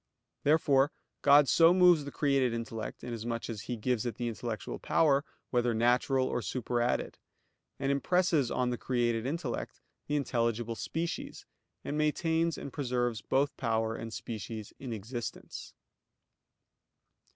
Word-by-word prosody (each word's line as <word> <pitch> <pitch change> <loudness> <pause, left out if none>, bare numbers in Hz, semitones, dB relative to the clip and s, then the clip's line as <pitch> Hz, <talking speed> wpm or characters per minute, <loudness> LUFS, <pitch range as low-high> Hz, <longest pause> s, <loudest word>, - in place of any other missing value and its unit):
Therefore 145 -2 +4 0.3
God 145 0 +7
so 165 +4 +6
moves 180 -5 +6
the 140 - -6
created 135 -5 +1
intellect, 115 -1 -5
inasmuch 115 0 -4
as 105 -3 -6
He 120 - -4
gives 120 0 0
it 120 -4 -3
the 120 - -3
intellectual 115 -3 -4
power, 140 -3 +3 0.3
whether 120 -2 +2
natural, 125 +3 +3
or 120 - -1
superadded; 120 +1 -1 0.6
and 135 0 0
impresses 155 -2 +2
on 125 -1 0
the 120 - -3
created 120 -2 0
intellect 145 -5 -4 0.3
the 145 - 0
intelligible 115 -4 0
species, 165 +8 -4 0.4
and 150 +2 -2
maintains 160 +2 +1
and 140 - -7
preserves 120 -4 -1
both 140 +2 +1
power 110 -1 0
and 115 0 -6
species 110 -1 -6
in 130 -3 -6
existence. 115 +2 -6
125 Hz, 130 wpm, -31 LUFS, 115-145 Hz, 0.6 s, God